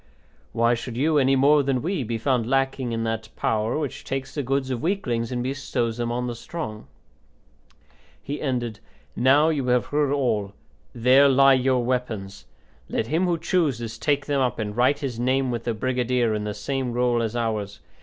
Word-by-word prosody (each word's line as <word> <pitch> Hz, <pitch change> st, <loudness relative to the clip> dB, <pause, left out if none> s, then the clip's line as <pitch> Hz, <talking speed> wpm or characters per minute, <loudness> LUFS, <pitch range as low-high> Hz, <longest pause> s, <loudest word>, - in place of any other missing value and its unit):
Why 115 Hz, +1 st, +2 dB
should 120 Hz, 0 st, -5 dB
you, 150 Hz, +3 st, +3 dB
any 135 Hz, 0 st, +3 dB
more 145 Hz, +3 st, +5 dB
than 135 Hz, -2 st, -1 dB
we, 175 Hz, -4 st, -1 dB
be 115 Hz, 0 st, -3 dB
found 120 Hz, -1 st, 0 dB
lacking 135 Hz, -2 st, 0 dB
in 115 Hz, 0 st, -2 dB
that 115 Hz, -1 st, -3 dB
power 110 Hz, +3 st, 0 dB
which 150 Hz, -4 st, -4 dB
takes 135 Hz, -1 st, -4 dB
the 145 Hz, -, -2 dB
goods 135 Hz, 0 st, -1 dB
of 125 Hz, -, -2 dB
weaklings 130 Hz, -, -1 dB
and 120 Hz, -1 st, -2 dB
bestows 125 Hz, -3 st, -2 dB
them 120 Hz, -1 st, -2 dB
on 125 Hz, +1 st, -2 dB
the 120 Hz, -, -3 dB
strong?" 115 Hz, -3 st, -7 dB, 1.3 s
He 145 Hz, +2 st, -6 dB
ended: 120 Hz, -6 st, -2 dB, 0.4 s
"Now 140 Hz, +6 st, +4 dB
you 140 Hz, -5 st, -1 dB
have 125 Hz, -1 st, +2 dB
heard 145 Hz, -1 st, 0 dB
all. 110 Hz, -8 st, 0 dB, 0.4 s
There 130 Hz, +4 st, +5 dB
lie 135 Hz, 0 st, +6 dB
your 130 Hz, -1 st, +2 dB
weapons; 110 Hz, -6 st, -3 dB, 0.4 s
let -, -, -1 dB
him 165 Hz, +5 st, +1 dB
who 175 Hz, -1 st, +1 dB
chooses 125 Hz, -11 st, -1 dB
take 145 Hz, -2 st, 0 dB
them 140 Hz, -2 st, 0 dB
up 125 Hz, -2 st, 0 dB
and 105 Hz, -2 st, -4 dB
write 130 Hz, +4 st, +3 dB
his 125 Hz, -5 st, -4 dB
name 130 Hz, +1 st, +1 dB
with 120 Hz, -1 st, -4 dB
the 115 Hz, -, 0 dB
brigadier 125 Hz, -1 st, 0 dB
in 105 Hz, 0 st, -2 dB
the 105 Hz, -1 st, -4 dB
same 135 Hz, -3 st, -3 dB
roll 120 Hz, -1 st, +1 dB
as 115 Hz, 0 st, -2 dB
ours. 110 Hz, -4 st, -2 dB
125 Hz, 185 wpm, -24 LUFS, 115-135 Hz, 1.3 s, lie